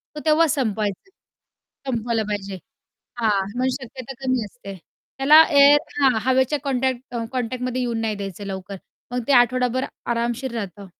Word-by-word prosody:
तर -, -, -5 dB
तेव्हा 320 Hz, +1 st, +4 dB
संपवायचं, 220 Hz, -, -2 dB, 0.8 s
संपवलं 230 Hz, -1 st, -1 dB
पाहिजे 200 Hz, -2 st, -4 dB, 0.7 s
हां. 210 Hz, -3 st, +2 dB, 0.2 s
मग 255 Hz, -, +1 dB
शक्यता 255 Hz, +1 st, -8 dB
कमी 255 Hz, -3 st, 0 dB
असते. 200 Hz, -2 st, -10 dB, 0.4 s
त्याला 305 Hz, +4 st, +8 dB
एअर 285 Hz, 0 st, +7 dB, 0.2 s
हां, 270 Hz, -2 st, +5 dB
हवेच्या 260 Hz, +3 st, +2 dB
कॉन्टॅक्ट 260 Hz, -2 st, -2 dB, 0.2 s
कॉन्टॅक्टमध्ये 250 Hz, 0 st, -2 dB
येऊन 235 Hz, -2 st, -2 dB
नाही 220 Hz, -1 st, -1 dB
द्यायचं 200 Hz, 0 st, -7 dB
लवकर. 190 Hz, 0 st, -6 dB, 0.4 s
मग 250 Hz, -, -1 dB
ते -, -, +4 dB
आठवडाभर 250 Hz, +1 st, +3 dB, 0.2 s
आरामशीर 235 Hz, +2 st, -2 dB
राहतं. 200 Hz, -2 st, -6 dB
245 Hz, 135 wpm, -22 LUFS, 215-260 Hz, 0.8 s, त्याला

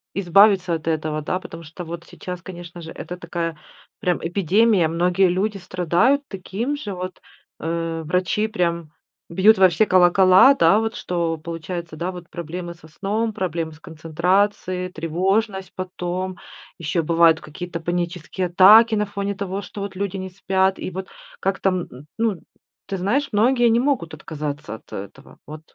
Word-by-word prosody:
избавиться 195 Hz, -1 st, +4 dB
от 160 Hz, 0 st, -4 dB
этого, 155 Hz, -1 st, -1 dB
да. 180 Hz, +5 st, -2 dB
Потому 165 Hz, -2 st, -10 dB
что 165 Hz, +3 st, -9 dB
вот 170 Hz, +1 st, -7 dB
сейчас, 180 Hz, -1 st, -8 dB
конечно 175 Hz, -1 st, -9 dB
же, 165 Hz, 0 st, -8 dB
это 180 Hz, -, -7 dB
такая 170 Hz, -2 st, -4 dB, 0.4 s
прям 180 Hz, -5 st, 0 dB
эпидемия, 195 Hz, +1 st, +3 dB
многие 180 Hz, +3 st, +2 dB
люди 200 Hz, +3 st, -1 dB
страдают 180 Hz, -, +1 dB
таким 215 Hz, +8 st, -3 dB
же, 210 Hz, -9 st, -5 dB
вот, 185 Hz, 0 st, -6 dB, 0.4 s
э. 165 Hz, 0 st, -2 dB
Врачи 185 Hz, +6 st, 0 dB
прям 170 Hz, -6 st, -2 dB, 0.4 s
бьют 195 Hz, +5 st, +5 dB
во 190 Hz, -1 st, +7 dB
все 215 Hz, +6 st, +2 dB
колокола, 185 Hz, +6 st, +6 dB
да 190 Hz, +3 st, +5 dB
вот, 225 Hz, 0 st, -2 dB
что 170 Hz, -2 st, -2 dB
получается, 165 Hz, +1 st, -6 dB
да 175 Hz, +4 st, -3 dB
вот, 180 Hz, -1 st, -10 dB
проблемы 175 Hz, +1 st, -6 dB
со 160 Hz, -1 st, -17 dB
сном, 210 Hz, +7 st, -2 dB
проблемы 165 Hz, -4 st, -3 dB
с 155 Hz, -, -17 dB
концентрацией, 180 Hz, +4 st, -1 dB
тревожность 190 Hz, +4 st, -1 dB
потом, 185 Hz, 0 st, -4 dB, 0.4 s
ещё 165 Hz, +1 st, -1 dB
бывают 165 Hz, 0 st, +4 dB
какие-то 170 Hz, +2 st, -7 dB
панические 175 Hz, +1 st, -3 dB
атаки 210 Hz, +6 st, +7 dB
на 210 Hz, 0 st, +1 dB
фоне 200 Hz, 0 st, -3 dB
того, 200 Hz, 0 st, -4 dB
что 205 Hz, +1 st, -8 dB
вот 200 Hz, -2 st, -5 dB
люди 200 Hz, 0 st, -3 dB
не 190 Hz, 0 st, -5 dB
спят. 190 Hz, 0 st, 0 dB
И -, -, -5 dB
вот 190 Hz, +2 st, -6 dB, 0.3 s
как 190 Hz, 0 st, -1 dB
там 185 Hz, -2 st, +1 dB
н -, -, -11 dB
н 135 Hz, +4 st, -13 dB
ну, 215 Hz, -7 st, 0 dB, 0.5 s
ты 195 Hz, -, -3 dB
знаешь, 250 Hz, +10 st, 0 dB
многие 240 Hz, +3 st, +3 dB
не 230 Hz, +1 st, +3 dB
могут 255 Hz, -, 0 dB
отказаться 145 Hz, -7 st, -5 dB
от 110 Hz, -, -15 dB
этого, 100 Hz, +8 st, -9 dB
вот 155 Hz, +1 st, -8 dB
180 Hz, 165 wpm, -22 LUFS, 165-195 Hz, 0.5 s, во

